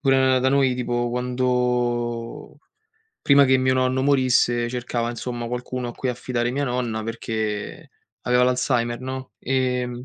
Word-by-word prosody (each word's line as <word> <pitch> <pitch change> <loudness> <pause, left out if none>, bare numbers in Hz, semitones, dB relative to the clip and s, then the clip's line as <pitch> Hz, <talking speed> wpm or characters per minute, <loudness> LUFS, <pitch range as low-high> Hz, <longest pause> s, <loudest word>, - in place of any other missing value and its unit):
pure 135 -1 +3
na 130 -1 +4
da 130 - +2
noi 135 -2 +3
tipo 120 -1 -1
quando 125 0 -1 0.6
prima 140 0 +6
che 130 0 +4
mio 130 0 +2
nonno 130 0 +1
morisse 125 -3 +2
cercava 120 -1 -2
insomma 120 0 -5
qualcuno 125 +1 -4
a - - -6
cui 130 - -3
affidare 120 -1 -2
mia 140 +3 -1
nonna 120 -4 -2
perché 110 -2 -4 0.3
aveva 125 0 +3
l'Alzheimer, 120 -1 0
no. 130 0 -6
Ehm, 125 -1 -1
125 Hz, 145 wpm, -23 LUFS, 120-130 Hz, 0.6 s, prima